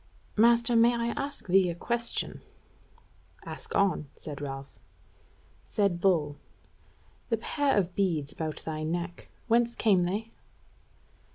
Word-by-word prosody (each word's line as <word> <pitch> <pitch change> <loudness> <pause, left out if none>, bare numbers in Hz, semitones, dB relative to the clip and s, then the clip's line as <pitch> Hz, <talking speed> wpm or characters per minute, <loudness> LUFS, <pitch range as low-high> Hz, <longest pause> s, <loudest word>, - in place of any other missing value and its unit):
Master, 235 +2 +5
may 235 +1 +5
I 235 0 -1
ask 280 +4 -4
thee 185 0 +4
a 170 - -3
question?" 235 +6 -2 1.0
"Ask - - -7
on," 190 -7 +2
said 145 -2 -8
Ralph. 135 -1 -7 0.9
Said 200 -5 +1
Bull: 155 -7 +2 0.9
"The 230 - +2
pair 275 +3 +1
of 185 -3 +1
beads 165 -7 0
about 155 -1 -5
thy 155 -1 -3
neck, 170 +2 -4 0.2
whence 235 0 +3
came 190 -5 +3
they?" 210 +5 -3
195 Hz, 120 wpm, -29 LUFS, 160-235 Hz, 1.0 s, Master